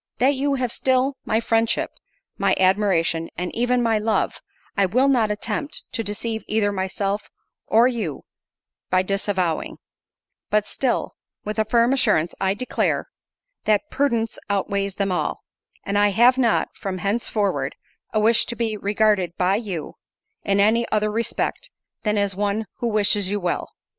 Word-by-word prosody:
"That 265 +3 +3
you 280 +1 0
have 250 -3 -1
still 260 +2 +1
my 220 - +1
friendship, 225 0 +1 0.4
my 195 -1 +2
admiration, 185 -4 +2
and 180 0 -3
even 245 +1 +1
my 225 -2 +2
love, 220 +1 0 0.3
I 200 -2 +3
will 255 +8 +3
not 240 -6 +3
attempt 215 +7 -3
to 225 - -2
deceive 220 +2 -3
either 210 -1 +1
myself 195 +1 -2 0.4
or 230 +3 +5
you 220 - -3 0.7
by 185 0 +3
disavowing; 190 -4 -1 0.7
but 210 -1 +2
still, 255 +3 -1 0.3
with 215 +1 -3
a 215 - +3
firm 235 +3 +3
assurance, 210 -11 +2
I 190 0 +1
declare, 255 +4 -1 0.6
that 215 +7 +1
prudence 235 -5 0
outweighs 200 0 -1
them 200 -1 -1
all; 180 - -2 0.4
and 200 +1 0
I 205 - +5
have 235 +6 +5
not, 240 -4 +2
from 195 -2 -4
henceforward, 205 0 -1 0.4
a 215 - +1
wish 225 +2 +4
to 235 - -4
be 225 -2 -1
regarded 205 -4 +1
by 185 +2 +2
you, 195 -9 -5 0.5
in 200 0 +1
any 225 +3 +3
other 215 0 +1
respect 235 - -2 0.3
than 210 -1 0
as 200 -2 0
one 205 +2 -1
'who 240 - -2
wishes 205 -3 +3
you 205 +1 -1
well. 180 -2 -2
210 Hz, 155 wpm, -23 LUFS, 195-235 Hz, 0.7 s, or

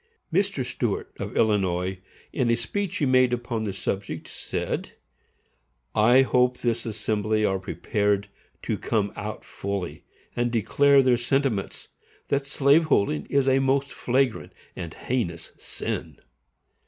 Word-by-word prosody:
Mr. 190 -7 +1
Stuart, 120 -4 -2
of - - -4
Illinois, 95 -3 +1 0.3
in 125 -4 +1
a 115 - +4
speech 190 - -3
he 145 - +1
made 130 -1 +4
upon 120 -2 -2
the 100 - -1
subject, 95 +1 -4
said: - - -4 1.0
I 120 +5 +6
hope 125 -1 +2
this 120 -1 -1
assembly 110 0 0
are 95 -1 +1
prepared 100 +1 0 0.4
to - - -2
come 100 -3 0
out 105 0 -6
fully 95 -6 -4 0.3
and 120 0 +1
declare 140 +5 +4
their 125 -2 +4
sentiments, 125 -4 -1 0.4
that 140 0 0
slave 145 +3 +4
holding 90 - +1
is 140 -1 +2
a 135 0 +4
most 135 +1 +1
flagrant 130 -1 0 0.2
and 85 -2 -6
heinous 85 -10 -3
SIN. - - -5
120 Hz, 130 wpm, -25 LUFS, 100-135 Hz, 1.0 s, I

